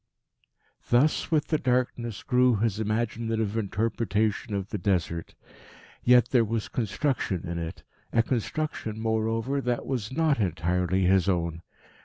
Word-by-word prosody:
Thus 130 +6 +3
with 155 -2 +1
the 155 - +2
darkness 125 -3 -1
grew 125 -1 +3
his 105 0 0
imaginative 110 0 -1
interpretation 110 0 -1
of 100 0 -3
the 105 - -3
Desert. 85 -4 -1 0.7
Yet 125 0 +5
there 120 -3 +4
was 110 0 -2
construction 110 - -1
in 85 0 -3
it, 85 0 -6 0.3
a 115 - +3
construction, 120 -2 -2
moreover, 115 +4 0
that 125 -2 -1
was 125 -5 -3
not 155 -2 +2
entirely 90 0 0
his 95 0 +3
own. 85 -2 -1
110 Hz, 130 wpm, -27 LUFS, 95-125 Hz, 0.7 s, Yet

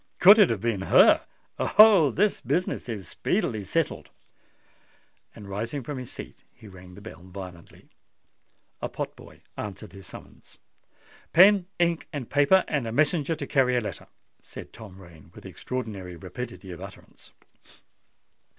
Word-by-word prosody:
could 200 +4 +8
it 205 - +6
have 110 -4 -2
been 115 -4 -1
her? - - +6 0.4
Oh! 205 -8 +6
this 205 +8 0
business 180 -7 -2
is 105 -6 -6
speedily 110 -2 -2
settled!" 160 - -2 1.3
And 100 - -11
rising 115 +8 -4
from 140 +2 -6
his 125 - -9
seat, - - -11
he 110 - -15
rang 90 -2 -14
the 100 - -13
bell 100 -6 -11
violently. 90 -2 -12 0.9
A - - -3
pot - - -6
boy - - -16 0.2
answered 100 -4 -7
the 95 0 -12
summons. - - -14 0.8
"Pen, 190 +1 +6
ink, 170 -1 0
and 140 -7 -7
paper, 145 +7 +4
and 140 -6 -2
a - - -4
messenger 155 +4 +1
to 155 - -6
carry 125 -3 +2
a - - +3
letter," 105 - -7 0.3
said - - -12
Tom 100 -4 -12
Rain, 85 -4 -16
with - - -13
extraordinary 105 -8 -6
rapidity 95 +1 -8
of 85 - -9
utterance. - - -13
115 Hz, 150 wpm, -26 LUFS, 95-155 Hz, 1.3 s, could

